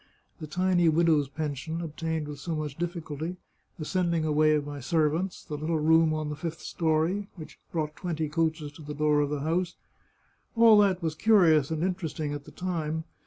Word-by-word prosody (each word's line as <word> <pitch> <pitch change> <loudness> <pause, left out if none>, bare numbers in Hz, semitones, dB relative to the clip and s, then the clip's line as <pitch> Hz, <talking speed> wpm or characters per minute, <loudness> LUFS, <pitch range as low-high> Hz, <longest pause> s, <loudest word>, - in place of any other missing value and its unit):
The 155 - -6
tiny 180 +1 +2
widow's 155 -3 +3
pension, 155 +2 -4
obtained 160 -1 -3
with 145 -1 -7
so 165 +3 -3
much 150 -2 -4
difficulty, 170 -1 -4 0.4
the 155 - -5
sending 170 -2 0
away 155 0 +3
of 145 -1 -1
my 145 -1 -6
servants, 160 +6 0
the - - -7
little 160 +2 0
room 160 +1 +4
on 155 -1 -2
the 150 - -3
fifth 165 +1 -5
story, 165 +5 0
which 160 -4 -11
brought 155 -2 -2
twenty 165 -4 -3
coaches 160 -1 -1
to 150 - -14
the 150 0 -7
door 150 0 +2
of 145 - 0
the 145 -1 -2
house 170 +4 -1 0.4
— - - -40
all 225 -2 +7
that 190 -3 +3
was 160 -1 0
curious 160 -7 +4
and 160 0 -2
interesting 165 -5 -2
at 145 0 -6
the - - -12
time. 160 -3 -3
160 Hz, 190 wpm, -28 LUFS, 150-170 Hz, 0.4 s, all